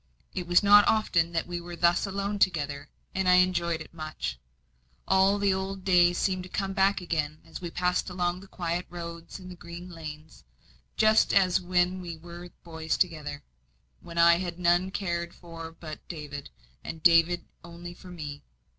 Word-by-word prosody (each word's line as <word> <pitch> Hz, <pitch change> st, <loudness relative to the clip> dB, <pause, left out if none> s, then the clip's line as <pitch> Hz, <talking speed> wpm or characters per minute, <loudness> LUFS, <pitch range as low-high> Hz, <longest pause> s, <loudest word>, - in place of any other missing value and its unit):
It 180 Hz, -2 st, -4 dB
was 175 Hz, +3 st, +4 dB
not 205 Hz, 0 st, +8 dB
often 170 Hz, -6 st, +2 dB
that 165 Hz, -, 0 dB
we 175 Hz, 0 st, -5 dB
were 175 Hz, 0 st, -8 dB
thus 170 Hz, +3 st, +3 dB
alone 200 Hz, +1 st, -2 dB
together, 145 Hz, -6 st, 0 dB, 0.2 s
and 190 Hz, -1 st, +1 dB
I 180 Hz, -, +7 dB
enjoyed 175 Hz, -2 st, +2 dB
it 160 Hz, -, -11 dB
much. 155 Hz, -, -5 dB, 0.7 s
All 190 Hz, +1 st, +4 dB
the 200 Hz, -1 st, +2 dB
old 190 Hz, 0 st, -4 dB
days 175 Hz, -2 st, +4 dB
seemed 185 Hz, -2 st, 0 dB
to 185 Hz, -, -9 dB
come 195 Hz, 0 st, -2 dB
back 195 Hz, 0 st, +2 dB
again 155 Hz, -3 st, -2 dB
as -, -, -9 dB
we 175 Hz, -, -4 dB
passed 180 Hz, +2 st, 0 dB
along 180 Hz, 0 st, -1 dB
the 195 Hz, -, -13 dB
quiet 175 Hz, -1 st, -3 dB
roads 170 Hz, -1 st, -7 dB
and 185 Hz, -2 st, -11 dB
green 170 Hz, +2 st, -9 dB
lanes, 155 Hz, -1 st, -9 dB, 0.5 s
just 215 Hz, 0 st, +4 dB
as 185 Hz, -3 st, +4 dB
when 180 Hz, +1 st, +1 dB
we 170 Hz, -2 st, -6 dB
were 175 Hz, +2 st, -10 dB
boys 160 Hz, -1 st, -3 dB
together, 150 Hz, -5 st, -1 dB, 0.6 s
when 170 Hz, -, -10 dB
I 170 Hz, 0 st, +6 dB
had 175 Hz, -2 st, -4 dB
none 175 Hz, +1 st, +3 dB
I -, -, -6 dB
cared 170 Hz, -3 st, -3 dB
for 165 Hz, -2 st, -9 dB
but 155 Hz, -2 st, -9 dB
David, 145 Hz, -4 st, -7 dB, 0.3 s
and 160 Hz, -1 st, -7 dB
David 170 Hz, +1 st, +5 dB
cared -, -, -31 dB, 0.2 s
only 175 Hz, +1 st, -8 dB
for 180 Hz, +1 st, -14 dB
me. 150 Hz, -5 st, -7 dB
175 Hz, 180 wpm, -28 LUFS, 165-185 Hz, 0.7 s, not